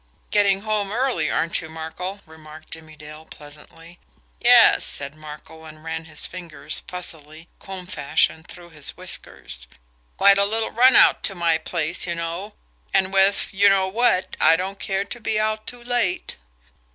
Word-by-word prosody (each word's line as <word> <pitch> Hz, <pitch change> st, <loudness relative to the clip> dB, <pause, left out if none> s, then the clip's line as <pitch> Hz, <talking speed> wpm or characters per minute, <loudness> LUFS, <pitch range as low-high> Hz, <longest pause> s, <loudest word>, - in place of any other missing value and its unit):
"Getting 200 Hz, -2 st, +3 dB
home 210 Hz, -2 st, -2 dB
early, 235 Hz, -, 0 dB
aren't 165 Hz, -, 0 dB
you, 160 Hz, -, -9 dB
Markel?" 160 Hz, +5 st, -6 dB
remarked 155 Hz, -1 st, -14 dB
Jimmie 160 Hz, -1 st, -10 dB
Dale 150 Hz, +1 st, -11 dB
pleasantly. 160 Hz, +4 st, -13 dB, 0.4 s
"Yes," -, -, +6 dB
said 140 Hz, 0 st, -5 dB
Markel, 155 Hz, +1 st, -12 dB
and 155 Hz, 0 st, -13 dB
ran 160 Hz, 0 st, -5 dB
his 155 Hz, -1 st, -1 dB
fingers 175 Hz, -3 st, -6 dB
fussily, 160 Hz, -3 st, -2 dB
comb 190 Hz, -2 st, -8 dB
fashion, 155 Hz, -1 st, 0 dB
through 175 Hz, 0 st, -12 dB
his 150 Hz, -3 st, -2 dB
whiskers. -, -, -4 dB, 0.5 s
"Quite 200 Hz, 0 st, +5 dB
a 200 Hz, -, +4 dB
little 220 Hz, +2 st, -2 dB
run 250 Hz, +2 st, +5 dB
out -, -, +6 dB
to 195 Hz, -, -3 dB
my 170 Hz, -2 st, +1 dB
place, 170 Hz, +1 st, -1 dB
you 170 Hz, -, -2 dB
know 170 Hz, +5 st, -5 dB, 0.4 s
and 190 Hz, 0 st, +1 dB
with, 195 Hz, +1 st, +2 dB
you 200 Hz, +1 st, +5 dB
know 195 Hz, -1 st, +3 dB
what, 190 Hz, -3 st, +1 dB
I 160 Hz, -, +6 dB
don't 190 Hz, +3 st, -4 dB
care 195 Hz, 0 st, -2 dB
to 240 Hz, -, -7 dB
be 220 Hz, -1 st, -1 dB
out 215 Hz, 0 st, -1 dB
too 245 Hz, -1 st, -6 dB
late." 240 Hz, -7 st, -1 dB
175 Hz, 165 wpm, -22 LUFS, 160-200 Hz, 0.5 s, Yes